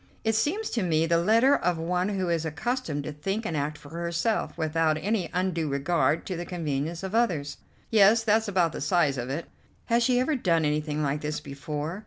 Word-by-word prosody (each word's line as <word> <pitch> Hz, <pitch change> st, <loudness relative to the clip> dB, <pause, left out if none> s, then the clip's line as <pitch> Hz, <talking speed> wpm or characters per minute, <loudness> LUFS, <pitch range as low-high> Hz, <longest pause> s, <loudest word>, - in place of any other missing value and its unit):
"It 220 Hz, -, +1 dB
seems 315 Hz, -, 0 dB
to 230 Hz, -, 0 dB
me 165 Hz, -3 st, +2 dB
the 165 Hz, 0 st, +2 dB
letter 230 Hz, +10 st, +4 dB
of 180 Hz, -9 st, 0 dB
one 180 Hz, +4 st, -1 dB
who 190 Hz, -3 st, -1 dB
is 170 Hz, -2 st, 0 dB
accustomed 160 Hz, -, -2 dB
to 155 Hz, -, -5 dB
think 195 Hz, +9 st, -3 dB
and 165 Hz, -, -2 dB
act 145 Hz, +1 st, -2 dB
for 145 Hz, -1 st, -14 dB
herself, 170 Hz, +7 st, -2 dB
without 160 Hz, -1 st, +1 dB
any 195 Hz, 0 st, -1 dB
undue 175 Hz, -4 st, -1 dB
regard 155 Hz, +3 st, +1 dB
to 185 Hz, -, -3 dB
the 175 Hz, -, -4 dB
convenience 165 Hz, -1 st, -3 dB
of 190 Hz, +1 st, -5 dB
others." 165 Hz, -12 st, 0 dB, 0.3 s
"Yes, 220 Hz, +1 st, +5 dB
that's 220 Hz, 0 st, +2 dB
about 180 Hz, -5 st, +2 dB
the -, -, -6 dB
size 145 Hz, -3 st, +2 dB
of 120 Hz, +1 st, -4 dB
it." 150 Hz, +5 st, -3 dB, 0.4 s
"Has 235 Hz, 0 st, +2 dB
she 245 Hz, +1 st, +3 dB
ever 275 Hz, +4 st, +1 dB
done 170 Hz, -, +1 dB
anything 150 Hz, 0 st, -1 dB
like 145 Hz, +1 st, -1 dB
this 150 Hz, 0 st, -3 dB
before?" 150 Hz, +4 st, -5 dB
170 Hz, 205 wpm, -27 LUFS, 150-210 Hz, 0.4 s, Yes